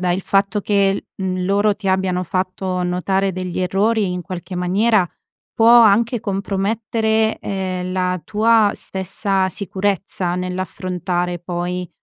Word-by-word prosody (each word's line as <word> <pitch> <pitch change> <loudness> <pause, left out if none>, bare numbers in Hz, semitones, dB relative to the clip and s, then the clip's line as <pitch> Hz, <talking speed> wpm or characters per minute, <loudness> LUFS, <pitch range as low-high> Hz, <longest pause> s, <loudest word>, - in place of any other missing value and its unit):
guarda 180 -1 0
il 185 - -1
fatto 195 +2 +1
che, 200 -1 +1
mhmm, 185 -1 -2
loro 200 +2 +2
ti 200 -2 -4
abbiano 190 -1 +1
fatto 185 +1 -2
notare 190 +2 0
degli 185 -1 -4
errori 195 +2 +1
in 180 - -4
qualche 180 +1 -7
maniera 190 +2 +2 0.5
può 225 0 +4
anche 235 0 +6
compromettere, 220 +2 0
ehm, 185 -2 -3
la 185 -1 0
tua 220 -1 +3
stessa 190 0 -2
sicurezza 190 -2 -2
nell'affrontare 180 -1 -3
poi 175 +1 -4
190 Hz, 125 wpm, -20 LUFS, 180-205 Hz, 0.5 s, anche